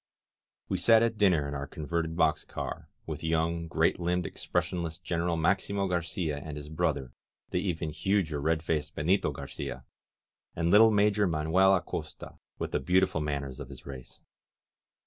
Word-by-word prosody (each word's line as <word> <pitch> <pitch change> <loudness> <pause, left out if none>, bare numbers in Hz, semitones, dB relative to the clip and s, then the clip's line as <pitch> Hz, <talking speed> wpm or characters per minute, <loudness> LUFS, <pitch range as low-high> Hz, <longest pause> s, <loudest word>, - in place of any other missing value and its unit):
We - - -1
sat 115 -1 +6
at 115 -1 +1
dinner 90 -8 +4
in 70 - -5
our 70 0 -4
converted 80 +2 -3
box 80 -2 +2
car, - - -6 0.2
with - - -6
young, 80 +1 0
great 80 +1 +1
limbed, 90 0 0
expressionless 85 -3 -2
Gen 85 -1 -3
eral 85 -1 0
Maximo 100 +3 +1
Garcia 85 -3 -2
and 75 +1 -7
his 75 0 -8
brother, 65 -4 -1 0.4
the 90 - +1
even 85 -4 -2
huger 85 -4 0
red 80 +1 +1
faced 75 -2 -2
Benito 90 +7 +2
Garcia, - - -6 0.7
and 85 0 +1
little 110 +2 +8
Major 105 -1 +3
Manuel 85 +4 +4
Acosta, 90 - -5 0.2
with - - -4
the - - +1
beautiful 90 +3 +2
manners 70 -3 -3
of 70 -3 -7
his 65 -2 -11
race. 65 -2 -10
85 Hz, 160 wpm, -29 LUFS, 75-90 Hz, 0.7 s, little